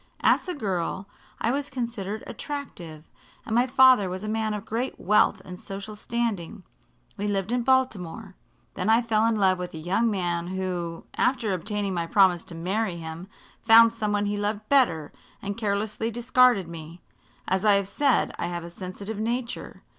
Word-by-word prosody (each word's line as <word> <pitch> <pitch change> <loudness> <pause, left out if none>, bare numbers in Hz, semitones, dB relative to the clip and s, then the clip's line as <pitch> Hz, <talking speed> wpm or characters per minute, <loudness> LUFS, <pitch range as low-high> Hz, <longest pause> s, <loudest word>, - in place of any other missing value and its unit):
"As - - +3
a 360 - -2
girl 190 - -2 0.3
I 230 - +1
was 285 +2 -2
considered 230 -5 -4
attractive, 175 - -7 0.4
and 220 - -4
my 240 +3 +3
father 255 -6 +6
was 185 +2 -5
a - - -4
man 220 0 -1
of 210 0 -6
great 235 +5 -3
wealth 210 +1 +3
and 180 0 -9
social 200 +2 -7
standing. 215 -4 -3 0.5
We 205 - -2
lived 195 0 -1
in 245 0 +1
Baltimore. 240 -9 0 0.4
Then - - -2
I 225 +2 +5
fell 225 -1 +2
in 230 - +2
love 190 -3 +3
with 180 -2 -5
a - - -5
young 190 +9 +1
man 175 -4 -1
who, 180 -3 -4
after 230 -6 +1
obtaining 200 +2 -2
my 170 -2 -2
promise 185 -2 +4
to 170 - -9
marry 185 +2 -1
him, 165 +2 -7 0.4
found 230 0 +7
some 215 -2 -2
one 205 0 +1
he 205 0 -1
loved 205 +1 -2
better 175 - +3 0.3
and 200 0 -4
carelessly 215 +1 -1
discarded 240 -4 +3
me. 165 0 -9 0.5
As 190 +1 0
I 210 -1 +5
have 200 -1 +2
said, 275 +5 +2
I - - -1
have 175 -1 -4
a 170 - -9
sensitive 195 +4 -7
nature. 235 +2 -4
205 Hz, 175 wpm, -26 LUFS, 180-230 Hz, 0.5 s, found